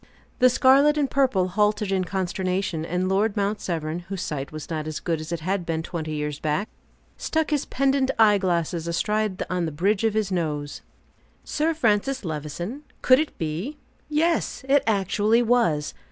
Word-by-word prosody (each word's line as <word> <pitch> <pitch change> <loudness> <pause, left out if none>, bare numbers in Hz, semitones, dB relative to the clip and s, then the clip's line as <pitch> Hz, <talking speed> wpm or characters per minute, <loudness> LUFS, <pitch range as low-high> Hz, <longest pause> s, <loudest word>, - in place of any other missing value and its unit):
The 255 - +6
scarlet 275 +4 +5
and 290 -2 +2
purple 250 -10 +2
halted 210 +1 +1
in 190 -1 +1
consternation, 185 -2 -2
and 180 +3 -1
Lord 200 +3 +1
Mount 205 +1 0
Severn, 160 -1 -3
whose 195 -2 -3
sight 140 -2 -4
was 155 -1 -7
not 155 -2 -4
as 155 - -4
good 165 -3 -2
as 155 +1 -7
it 170 -2 -3
had 185 +3 -1
been 160 -1 -2
twenty 160 -2 -4
years 150 -1 -3
back, 155 +7 -1 0.5
stuck 320 -1 -1
his 290 -2 +1
pendent 270 0 +1
eye 210 -2 +5
glasses 170 -2 -1
astride 210 +3 0
on 180 -2 -1
the - - -4
bridge 195 +8 +1
of 220 -1 +1
his 215 -3 0
nose. 150 -5 -2 0.6
Sir 315 +2 0
Francis 240 -1 +1
Levison? 165 - -5 0.2
Could 255 +1 +6
it 310 - -3
be? 170 - -4 0.3
Yes, 315 -1 0
it 280 +1 +4
actually 210 +3 +2
was! 220 -12 +1
195 Hz, 170 wpm, -24 LUFS, 165-235 Hz, 0.6 s, The